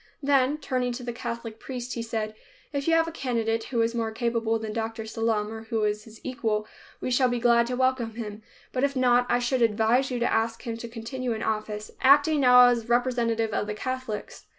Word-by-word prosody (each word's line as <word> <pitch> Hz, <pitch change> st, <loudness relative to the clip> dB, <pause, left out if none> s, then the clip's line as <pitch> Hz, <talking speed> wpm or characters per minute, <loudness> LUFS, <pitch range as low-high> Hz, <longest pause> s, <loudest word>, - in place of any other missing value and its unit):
Then, 275 Hz, 0 st, +3 dB
turning 255 Hz, -4 st, -1 dB
to 250 Hz, +1 st, -6 dB
the 240 Hz, -1 st, -4 dB
Catholic 230 Hz, -1 st, -6 dB
priest, 250 Hz, -1 st, -5 dB
he 235 Hz, -, -3 dB
said, 220 Hz, -2 st, -3 dB, 0.4 s
"If 280 Hz, +1 st, -2 dB
you 330 Hz, -, +4 dB
have 330 Hz, 0 st, +3 dB
a -, -, -4 dB
candidate 230 Hz, -6 st, -1 dB
who 235 Hz, -3 st, 0 dB
is 230 Hz, +1 st, 0 dB
more 230 Hz, -1 st, -1 dB
capable 230 Hz, -1 st, 0 dB
than 220 Hz, -1 st, -5 dB
Dr. 225 Hz, 0 st, -3 dB
Sallum 220 Hz, -1 st, -1 dB
or 225 Hz, 0 st, -7 dB
who 225 Hz, -1 st, -1 dB
is 210 Hz, 0 st, -1 dB
his 220 Hz, -1 st, -14 dB
equal, 220 Hz, -5 st, -1 dB, 0.4 s
we 255 Hz, -, -2 dB
shall 250 Hz, 0 st, +3 dB
be 245 Hz, -, 0 dB
glad 235 Hz, 0 st, +4 dB
to 250 Hz, -, -2 dB
welcome 255 Hz, -3 st, 0 dB
him, 215 Hz, -2 st, -6 dB, 0.3 s
but 255 Hz, -, 0 dB
if 280 Hz, 0 st, +1 dB
not, 245 Hz, -1 st, +3 dB
I 240 Hz, -, +3 dB
should 245 Hz, +1 st, 0 dB
advise 230 Hz, +4 st, +3 dB
you 250 Hz, -, -2 dB
to 240 Hz, -, 0 dB
ask 225 Hz, +1 st, 0 dB
him 230 Hz, -2 st, -3 dB
to 235 Hz, -, -7 dB
continue 235 Hz, +2 st, -4 dB
in 220 Hz, -, -4 dB
office, 215 Hz, -1 st, -3 dB
acting 290 Hz, +3 st, +5 dB
now 250 Hz, -2 st, +8 dB
as 235 Hz, -1 st, -1 dB
representative 235 Hz, -3 st, +1 dB
of 210 Hz, -, -1 dB
the 210 Hz, -, -3 dB
Catholics." 255 Hz, -2 st, -5 dB
235 Hz, 220 wpm, -26 LUFS, 225-255 Hz, 0.4 s, now